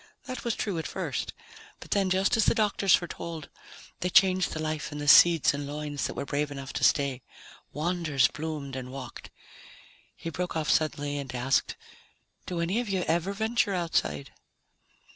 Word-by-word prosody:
That 255 Hz, -2 st, -6 dB
was 235 Hz, -2 st, -1 dB
true 195 Hz, -6 st, -2 dB
at 160 Hz, -, -4 dB
first. -, -, -3 dB, 0.5 s
But -, -, -13 dB
then, 195 Hz, -2 st, +2 dB
just 190 Hz, +1 st, +2 dB
as 225 Hz, -, +3 dB
the -, -, +3 dB
doctors 205 Hz, -4 st, +3 dB
foretold, 170 Hz, -3 st, -6 dB, 0.5 s
they 180 Hz, -, -1 dB
changed 185 Hz, -1 st, +4 dB
the 155 Hz, -, -4 dB
life 155 Hz, -1 st, -3 dB
in 150 Hz, -, -6 dB
the 145 Hz, 0 st, -4 dB
seeds 165 Hz, +1 st, +7 dB
and 145 Hz, 0 st, -4 dB
loins 145 Hz, 0 st, -3 dB
that -, -, -7 dB
were -, -, -3 dB
brave 145 Hz, +1 st, -1 dB
enough 135 Hz, -1 st, -7 dB
to -, -, -3 dB
stay. 140 Hz, -3 st, +2 dB, 0.5 s
Wonders 155 Hz, -4 st, +1 dB
bloomed 150 Hz, -3 st, -5 dB
and 130 Hz, -1 st, -6 dB
walked." 130 Hz, -3 st, -8 dB, 0.9 s
He 165 Hz, -, -6 dB
broke 180 Hz, +3 st, -3 dB
off 155 Hz, -1 st, 0 dB
suddenly 145 Hz, -2 st, 0 dB
and 135 Hz, -2 st, -6 dB
asked, 125 Hz, +2 st, 0 dB, 0.7 s
"Do 175 Hz, -2 st, -2 dB
any 180 Hz, +7 st, 0 dB
of 240 Hz, -3 st, -3 dB
you 190 Hz, -2 st, 0 dB
ever 170 Hz, +4 st, 0 dB
venture 220 Hz, -1 st, 0 dB
outside?" 160 Hz, -, -1 dB
160 Hz, 175 wpm, -28 LUFS, 145-185 Hz, 0.9 s, seeds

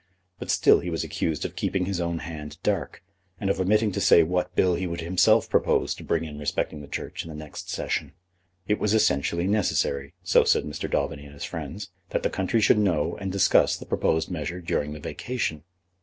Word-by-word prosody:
But -, -, -7 dB
still -, -, +5 dB
he 90 Hz, -, -4 dB
was 80 Hz, -2 st, -2 dB
accused 80 Hz, -3 st, -2 dB
of -, -, -5 dB
keeping 95 Hz, -2 st, -1 dB
his 95 Hz, -2 st, -2 dB
own 85 Hz, 0 st, -1 dB
hand 75 Hz, -2 st, -7 dB
dark, 90 Hz, -6 st, -1 dB, 0.4 s
and 100 Hz, -1 st, +1 dB
of 100 Hz, -, -2 dB
omitting 105 Hz, +3 st, +3 dB
to -, -, -2 dB
say 85 Hz, -, +7 dB
what 90 Hz, +2 st, -1 dB
bill 90 Hz, -1 st, +3 dB
he 90 Hz, +2 st, -1 dB
would 85 Hz, 0 st, -4 dB
himself 90 Hz, +2 st, +3 dB
propose -, -, +2 dB
to -, -, -10 dB
bring 80 Hz, -, 0 dB
in 75 Hz, -2 st, -7 dB
respecting 75 Hz, +1 st, -2 dB
the 70 Hz, -, -10 dB
Church -, -, -5 dB
in 85 Hz, -, -10 dB
the 80 Hz, -, -7 dB
next 75 Hz, -1 st, -8 dB
Session. -, -, -2 dB, 0.5 s
It 105 Hz, -, +1 dB
was 105 Hz, +1 st, +2 dB
essentially 85 Hz, -5 st, +2 dB
necessary, 85 Hz, -9 st, 0 dB
so -, -, +5 dB
said -, -, +3 dB
Mr. 75 Hz, +1 st, -5 dB
Daubeny 70 Hz, 0 st, -1 dB
and 70 Hz, 0 st, -12 dB
his 70 Hz, -, -8 dB
friends, 85 Hz, +5 st, -6 dB, 0.2 s
that -, -, -1 dB
the -, -, +1 dB
country 95 Hz, +4 st, 0 dB
should 105 Hz, -, +5 dB
know 85 Hz, -5 st, +1 dB
and 95 Hz, -2 st, -4 dB
discuss 100 Hz, 0 st, +4 dB
the -, -, -10 dB
proposed 80 Hz, +3 st, 0 dB
measure 85 Hz, +1 st, -3 dB
during 75 Hz, -4 st, -2 dB
the 75 Hz, -, -8 dB
vacation. 95 Hz, -, -3 dB
85 Hz, 210 wpm, -26 LUFS, 75-95 Hz, 0.5 s, say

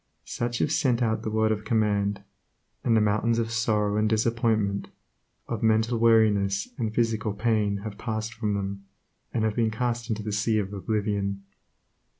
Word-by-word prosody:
Such 120 Hz, 0 st, -3 dB
have 145 Hz, -, 0 dB
sent 130 Hz, -6 st, +2 dB
out 110 Hz, -1 st, 0 dB
the -, -, -3 dB
word 110 Hz, 0 st, +2 dB
of 105 Hz, -1 st, -2 dB
command, 105 Hz, -3 st, 0 dB, 0.6 s
and 115 Hz, -2 st, +3 dB
the -, -, +4 dB
mountains 110 Hz, +2 st, +2 dB
of 115 Hz, -1 st, -1 dB
sorrow 105 Hz, -2 st, +1 dB
and 110 Hz, 0 st, +2 dB
disappointment, 110 Hz, -2 st, +1 dB, 0.6 s
of -, -, -3 dB
mental 110 Hz, +1 st, +2 dB
weariness 105 Hz, -4 st, +3 dB
and 110 Hz, -3 st, -1 dB
physical 110 Hz, -2 st, 0 dB
pain 105 Hz, -2 st, +1 dB
have 105 Hz, -2 st, -7 dB
passed 110 Hz, -1 st, -3 dB
from 110 Hz, -3 st, -1 dB
them, 100 Hz, 0 st, -4 dB, 0.5 s
and 115 Hz, -, -1 dB
have 110 Hz, -1 st, 0 dB
been 115 Hz, -2 st, +2 dB
cast 120 Hz, +1 st, -2 dB
into 110 Hz, -1 st, -2 dB
the 105 Hz, -, -3 dB
sea 105 Hz, +2 st, +1 dB
of 100 Hz, -1 st, -2 dB
oblivion. 100 Hz, 0 st, -2 dB
110 Hz, 165 wpm, -26 LUFS, 105-115 Hz, 0.6 s, the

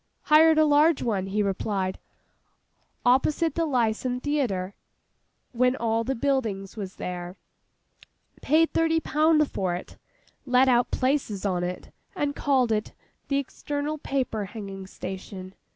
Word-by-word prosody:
'Hired 315 Hz, +1 st, +6 dB
a 310 Hz, -, +5 dB
large 300 Hz, +1 st, +4 dB
one,' 200 Hz, -5 st, -1 dB
he 205 Hz, +2 st, 0 dB
replied, 195 Hz, -1 st, -2 dB, 1.1 s
'opposite 290 Hz, +6 st, +3 dB
the 330 Hz, -1 st, 0 dB
Lyceum 245 Hz, -1 st, 0 dB
Theatre, 240 Hz, -10 st, -1 dB, 0.8 s
when 250 Hz, +1 st, +2 dB
the 230 Hz, +1 st, -1 dB
buildings 230 Hz, -9 st, -1 dB
was 195 Hz, -4 st, -6 dB
there. 180 Hz, 0 st, -6 dB, 1.1 s
Paid 320 Hz, +3 st, +3 dB
thirty 325 Hz, 0 st, +2 dB
pound 305 Hz, -1 st, +3 dB
for 185 Hz, -2 st, -1 dB
it; 180 Hz, -, -9 dB, 0.4 s
let 255 Hz, 0 st, +4 dB
out 245 Hz, -1 st, +3 dB
places 255 Hz, -7 st, -1 dB
on 180 Hz, -3 st, 0 dB
it, 180 Hz, +1 st, -5 dB, 0.2 s
and 290 Hz, -5 st, -1 dB
called 260 Hz, -5 st, +2 dB
it 215 Hz, -1 st, -1 dB, 0.3 s
"The 275 Hz, -, +1 dB
External 290 Hz, +2 st, -3 dB
Paper 255 Hz, -7 st, -2 dB
Hanging 195 Hz, -2 st, -8 dB
Station." 190 Hz, 0 st, -8 dB
245 Hz, 125 wpm, -26 LUFS, 195-290 Hz, 1.1 s, Hired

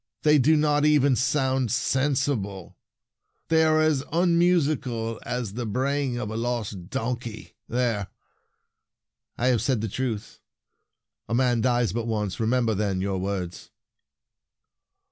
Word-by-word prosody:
They 150 Hz, -1 st, +5 dB
do 155 Hz, +4 st, +4 dB
not 150 Hz, -1 st, +2 dB
even 145 Hz, -3 st, +4 dB
sound 130 Hz, -1 st, +1 dB
sensible. 130 Hz, -8 st, -1 dB, 0.7 s
They 160 Hz, 0 st, +4 dB
are 155 Hz, 0 st, +3 dB
as 155 Hz, -3 st, +2 dB
unmusical 155 Hz, -9 st, +1 dB
as 120 Hz, -4 st, -4 dB
the 120 Hz, 0 st, -4 dB
bray 135 Hz, +6 st, 0 dB
ing 125 Hz, -2 st, -2 dB
of 110 Hz, -3 st, -4 dB
a -, -, -5 dB
lost 110 Hz, -6 st, -3 dB
donkey! 120 Hz, -1 st, -4 dB, 0.2 s
There! 115 Hz, -5 st, 0 dB, 1.3 s
I 125 Hz, -, +2 dB
have 120 Hz, -3 st, +2 dB
said 130 Hz, -5 st, +1 dB
the 110 Hz, -, -2 dB
truth. 110 Hz, -1 st, -4 dB, 0.9 s
A 115 Hz, -, 0 dB
man 120 Hz, -2 st, +2 dB
dies 120 Hz, -4 st, +1 dB
but 115 Hz, 0 st, -2 dB
once! 105 Hz, -5 st, -2 dB
Remember, 115 Hz, 0 st, +1 dB
then, 100 Hz, -2 st, -1 dB
your 95 Hz, 0 st, -1 dB
words." 95 Hz, -2 st, -4 dB
125 Hz, 130 wpm, -25 LUFS, 110-140 Hz, 1.3 s, They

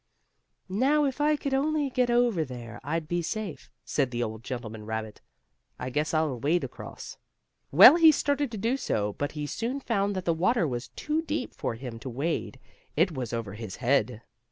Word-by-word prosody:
"Now, 270 Hz, +10 st, +2 dB
if 275 Hz, +1 st, -2 dB
I 300 Hz, +1 st, +4 dB
could 280 Hz, -2 st, -3 dB
only 290 Hz, 0 st, +1 dB
get 250 Hz, -1 st, +1 dB
over 240 Hz, -8 st, +3 dB
there 120 Hz, -5 st, -8 dB
I'd 155 Hz, +3 st, -2 dB
be 175 Hz, +2 st, 0 dB
safe," 205 Hz, +1 st, -5 dB, 0.2 s
said 135 Hz, -4 st, 0 dB
the 120 Hz, -1 st, -2 dB
old 110 Hz, 0 st, -5 dB
gentleman 115 Hz, -4 st, -6 dB
rabbit. 110 Hz, -1 st, -5 dB, 0.6 s
"I 125 Hz, +1 st, -5 dB
guess 150 Hz, +4 st, 0 dB
I'll 155 Hz, -6 st, 0 dB
wade 160 Hz, +8 st, +1 dB
across." -, -, -8 dB, 0.5 s
Well, 325 Hz, -, +10 dB
he 325 Hz, -2 st, +8 dB
started 285 Hz, -1 st, 0 dB
to -, -, -3 dB
do 230 Hz, +6 st, 0 dB
so, 105 Hz, -, -1 dB
but 145 Hz, +6 st, -3 dB
he 150 Hz, -1 st, -4 dB
soon 235 Hz, -, -3 dB
found 205 Hz, -6 st, 0 dB
that 185 Hz, -1 st, -3 dB
the 170 Hz, -, +3 dB
water 175 Hz, +3 st, +2 dB
was 120 Hz, -2 st, -4 dB
too 310 Hz, +1 st, -2 dB
deep 305 Hz, -4 st, -3 dB
for -, -, -3 dB
him 115 Hz, -1 st, -7 dB
to 130 Hz, -, -6 dB
wade. 135 Hz, +1 st, -2 dB, 0.4 s
It 170 Hz, +4 st, +3 dB
was 130 Hz, -6 st, -4 dB
over 115 Hz, -4 st, -4 dB
his 105 Hz, -2 st, -7 dB
head. 120 Hz, -3 st, +1 dB
160 Hz, 190 wpm, -28 LUFS, -, 0.6 s, Well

